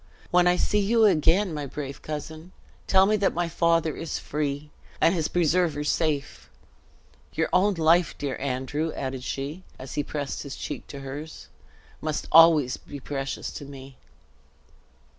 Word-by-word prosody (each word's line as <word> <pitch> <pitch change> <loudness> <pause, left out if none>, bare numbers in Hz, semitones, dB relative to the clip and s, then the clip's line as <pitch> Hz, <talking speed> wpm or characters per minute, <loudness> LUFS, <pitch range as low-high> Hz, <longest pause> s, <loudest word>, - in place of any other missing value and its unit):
"When 180 -1 +5
I 180 - +4
see 210 +3 +1
you 220 +2 +4
again, 175 +1 +3
my 145 -2 -4
brave 140 -1 -6
cousin, 155 +3 -7 0.3
tell 190 0 +5
me 215 +2 +2
that 200 -1 +1
my 175 0 0
father 165 -1 +1
is 165 - -4
free, 145 0 -3 0.3
and 165 - +4
his 165 -4 0
preserver 170 -3 +1
safe. 150 -2 -1 0.8
Your - - 0
own 195 +2 +3
life, 165 +1 +3
dear 140 -2 -3
Andrew," 140 +4 -2
added 130 -1 -4
she, 140 +7 -4 0.2
as 130 0 -8
he 145 - -1
pressed 145 -1 -4
his 140 -1 -7
cheek - - -6
to 140 - -8
hers, 145 +4 -8 0.5
"must 155 -1 -3
always 155 -5 +6
be 145 - -10
precious 135 0 -4
to 145 - -8
me." 135 -1 -11
155 Hz, 155 wpm, -26 LUFS, 140-175 Hz, 0.8 s, always